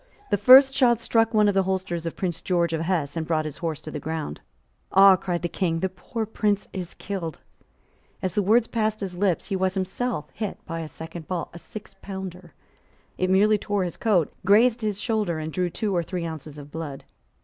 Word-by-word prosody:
The - - +4
first 265 +5 +8
shot 240 -4 +4
struck 225 -1 +2
one 215 -2 +4
of 205 - +3
the 195 - +3
holsters 185 -3 -2
of 165 - -4
Prince 175 -3 -3
George 170 -2 +1
of 160 - -1
Hesse, 165 -4 -1
and 160 -1 -3
brought 155 -2 +1
his 155 - -5
horse 160 -3 -3
to 155 - -8
the 150 - -4
ground. 160 - -4 0.5
"Ah!" 195 0 +8
cried 175 -2 -3
the - - +1
King; 165 -2 -1
"the 190 - 0
poor 220 +5 -5
Prince 210 -1 0
is 180 -3 -5
killed." 175 -6 -5 0.8
As 185 -2 -2
the 205 - +2
words 220 +4 +4
passed 215 -2 -1
his 190 -3 -4
lips, 185 -2 0
he 195 - 0
was 190 0 0
himself 190 0 -2
hit 210 -3 -4
by 165 +1 -4
a 160 - -5
second 160 +1 -9
ball, 180 -3 -3
a 170 - -9
sixpounder. 190 -5 -9 0.6
It 185 - +1
merely 205 +3 +4
tore 205 -1 -1
his 175 - -4
coat, 195 -9 +2
grazed 225 +5 +4
his 210 -2 -2
shoulder, 215 -7 -1
and 155 0 -5
drew 180 -1 0
two 205 +2 -2
or 175 - +2
three 175 0 -4
ounces 155 -2 -7
of 145 0 -10
blood. 155 -4 -6
185 Hz, 210 wpm, -25 LUFS, 165-205 Hz, 0.8 s, first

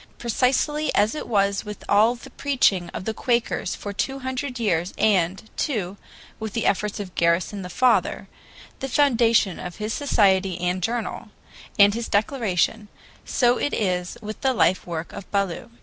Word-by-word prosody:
Precisely 265 +5 +1
as 210 +2 +3
it 305 - -5
was 200 -3 +1
with 210 -1 -8
all 215 +4 +4
the 240 - -13
preaching 205 -11 +1
of 185 - -7
the 220 - -1
Quakers 235 -5 -1
for 205 - -6
two 270 +6 -2
hundred 260 -1 -4
years 180 -5 0
and, 195 -1 +1
too, 200 -9 -2 0.4
with 220 -2 -5
the 230 - -1
efforts 210 +2 0
of 190 -3 -6
Garrison 170 +5 +1
the 180 - -7
father, 255 +7 +2 0.5
the 270 - -4
foundation 235 - +3
of 180 -1 -7
his 215 +1 -3
society 195 -9 +2
and 180 +1 -1
journal, 230 +4 -3 0.5
and 200 0 +7
his 230 +1 -4
Declaration, 210 -2 0 0.4
so 245 -1 +2
it 290 - -1
is 180 -1 -1
with 215 +1 -7
the 265 -2 +1
life 180 -3 +2
work 170 -1 -5
of 200 - -9
Ballou. 200 +2 -2
210 Hz, 165 wpm, -24 LUFS, 185-240 Hz, 0.5 s, and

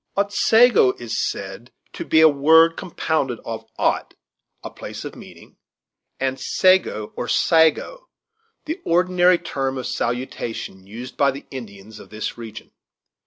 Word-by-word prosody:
Otsego 205 - +4
is 120 -1 -5
said 100 +5 -8 0.2
to - - -5
be 160 - +3
a 160 - +9
word 160 +3 +5
compounded 160 -8 -2
of 110 -1 -7
Ot, - - -1 0.5
a - - -7
place - - -8
of - - -7
meeting, - - -15 0.6
and 130 0 -2
Sego, 185 - +1
or 120 - -4
Sago, 165 - +2 0.6
the 320 +4 -5
ordinary 180 +1 +3
term 135 -6 -3
of 130 - -5
salutation 115 -5 -4
used 120 +5 -9
by 140 - +4
the 135 +1 -6
Indians 110 -4 -10
of - - -14
this 110 0 -5
region. 115 -2 -10
135 Hz, 135 wpm, -21 LUFS, 115-175 Hz, 0.6 s, a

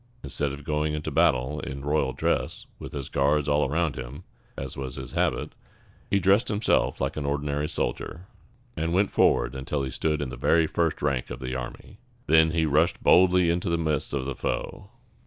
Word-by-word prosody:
Instead 75 -2 -2
of 70 +1 -8
going 75 0 -1
into 75 - -4
battle 75 -3 +2
in 70 +1 -6
royal 75 +1 +1
dress, - - -1
with - - -8
his 70 -3 -5
guards 70 +1 +1
all 75 -1 +2
around 80 -1 0
him, 65 +6 -7 0.3
as 65 -1 -5
was 65 -1 -5
his 65 - -7
habit, - - 0 0.6
he 100 - +3
dressed 100 +6 +3
himself 105 0 +1
like 70 +2 -2
an 75 - -2
ordinary 75 +1 -1
soldier, 80 +5 -3 0.5
and 80 +1 -1
went 100 +3 +2
forward - - +3
until 70 +1 -3
he 65 - -3
stood 75 +3 -1
in 70 -3 -3
the - - -6
very 80 0 +3
first 80 -1 -1
rank 70 -4 0
of - - -6
the 65 -1 -4
army. 60 -2 -7 0.3
Then 80 +1 +5
he 80 0 +1
rushed 80 +3 +2
boldly 90 -1 +5
into 85 +2 -1
the 85 - +1
midst 80 -4 -1
of 70 -2 -2
the 70 - -2
foe. - - -4
75 Hz, 195 wpm, -26 LUFS, 70-80 Hz, 0.6 s, Then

